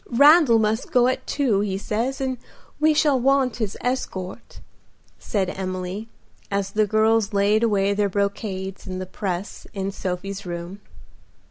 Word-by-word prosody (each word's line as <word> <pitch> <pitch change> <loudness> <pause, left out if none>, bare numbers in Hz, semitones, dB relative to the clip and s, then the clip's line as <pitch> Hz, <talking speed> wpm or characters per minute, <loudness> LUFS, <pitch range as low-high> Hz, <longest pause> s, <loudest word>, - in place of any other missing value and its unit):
Randal 285 0 +6
must 220 +6 0
go 250 -4 +4
at 255 - -2
two, 255 -9 +1
he 200 -2 -1
says, 230 +6 -2
and 260 -2 -2 0.4
we 310 +1 +4
shall 290 -3 +3
want 265 -1 +2
his 215 -4 -3
escort," 235 -5 -4 0.6
said 190 -3 -1
Emily, 185 +3 -4 0.4
as 200 -1 -1
the 215 +1 +2
girls 220 0 +2
laid 205 +2 +3
away 200 -3 +2
their 200 0 +1
brocades 200 -1 -3
in 185 -1 -4
the 185 - -4
press 185 0 -5
in 195 0 -2
Sophie's 195 +1 -4
room. 175 +3 -6
205 Hz, 145 wpm, -23 LUFS, 190-240 Hz, 0.6 s, Randal